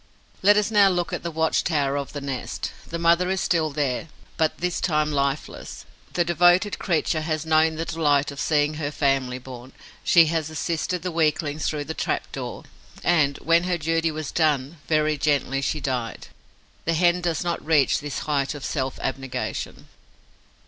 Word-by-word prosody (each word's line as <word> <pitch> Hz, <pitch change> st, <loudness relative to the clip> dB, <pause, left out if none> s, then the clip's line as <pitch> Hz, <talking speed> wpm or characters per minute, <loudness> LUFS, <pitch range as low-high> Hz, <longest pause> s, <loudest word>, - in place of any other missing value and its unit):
Let 205 Hz, +2 st, +6 dB
us 210 Hz, +1 st, +1 dB
now 205 Hz, -2 st, +6 dB
look 175 Hz, -2 st, -1 dB
at -, -, -2 dB
the 170 Hz, -, -3 dB
watch 160 Hz, 0 st, +1 dB
tower 145 Hz, -4 st, 0 dB
of 140 Hz, -1 st, -3 dB
the 145 Hz, -, -6 dB
nest. 135 Hz, -2 st, -4 dB, 0.2 s
The 170 Hz, -, -4 dB
mother 170 Hz, +2 st, +3 dB
is 190 Hz, 0 st, 0 dB
still 165 Hz, -3 st, +1 dB
there, 140 Hz, 0 st, -2 dB, 0.3 s
but 160 Hz, -1 st, +1 dB
this 180 Hz, 0 st, -2 dB
time 155 Hz, -3 st, +1 dB
lifeless. 140 Hz, 0 st, -3 dB, 0.3 s
The 175 Hz, -, +1 dB
devoted 175 Hz, +4 st, +3 dB
creature 160 Hz, -3 st, 0 dB
has 155 Hz, 0 st, -2 dB
known 160 Hz, 0 st, +3 dB
the 165 Hz, +1 st, -3 dB
delight 150 Hz, -4 st, +1 dB
of 140 Hz, -, -9 dB
seeing 150 Hz, -1 st, +2 dB
her 150 Hz, -1 st, -3 dB
family 135 Hz, -3 st, 0 dB
born; 130 Hz, 0 st, -10 dB, 0.3 s
she 170 Hz, -2 st, +6 dB
has 160 Hz, -1 st, -1 dB
assisted 165 Hz, +2 st, -2 dB
the 180 Hz, -, -2 dB
weaklings 155 Hz, -2 st, 0 dB
through 150 Hz, -2 st, -2 dB
the 155 Hz, +3 st, -5 dB
trap -, -, -2 dB
door; -, -, -6 dB, 0.4 s
and, 150 Hz, -5 st, +3 dB
when 170 Hz, +3 st, +3 dB
her 180 Hz, -1 st, 0 dB
duty 165 Hz, +1 st, 0 dB
was 155 Hz, -2 st, -5 dB
done, 150 Hz, -1 st, 0 dB
very 155 Hz, -1 st, +1 dB
gently 135 Hz, -2 st, +1 dB
she 145 Hz, +3 st, -1 dB
died. 125 Hz, -5 st, -3 dB, 0.6 s
The 165 Hz, -, +1 dB
Hen 175 Hz, +1 st, +3 dB
does 170 Hz, -3 st, -1 dB
not 170 Hz, -1 st, -2 dB
reach 155 Hz, -3 st, +3 dB
this 145 Hz, -1 st, -5 dB
height 140 Hz, -1 st, 0 dB
of 145 Hz, -, -7 dB
self 135 Hz, -3 st, -2 dB
abnegation. 130 Hz, -1 st, -4 dB
155 Hz, 175 wpm, -24 LUFS, 140-170 Hz, 0.6 s, Let